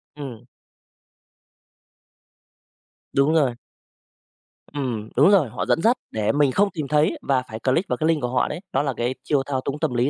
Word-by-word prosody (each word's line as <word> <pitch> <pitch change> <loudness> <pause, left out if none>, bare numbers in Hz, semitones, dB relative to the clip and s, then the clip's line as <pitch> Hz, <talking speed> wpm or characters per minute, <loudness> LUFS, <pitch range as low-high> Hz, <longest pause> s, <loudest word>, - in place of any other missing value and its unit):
Ừm. 130 -6 -8 2.7
Đúng 140 +3 +3
rồi. 140 -7 +2 1.2
Ừm, 120 -7 -3
đúng 145 +8 +6
rồi, 175 - +4
họ 120 - -4
dẫn 165 - +1
dắt 235 +5 +3
để 110 -2 0
mình 145 -2 +2
không 200 +8 +2
tìm 155 -6 -4
thấy 150 +1 +2
và 130 -2 +1
phải 110 0 -6
click 135 - +1
vào - - 0
cái 155 - 0
link 160 -2 +2
của 125 - -1
họ 125 0 +1
đấy, 150 - -5
đó 135 - +2
là 140 -3 -1
cái 120 +2 -1
chiêu 140 -3 +1
thao 135 -2 -2
túng 140 +2 -4
tâm 125 - -1
lý 120 +3 +1
140 Hz, 185 wpm, -23 LUFS, 125-150 Hz, 2.7 s, đúng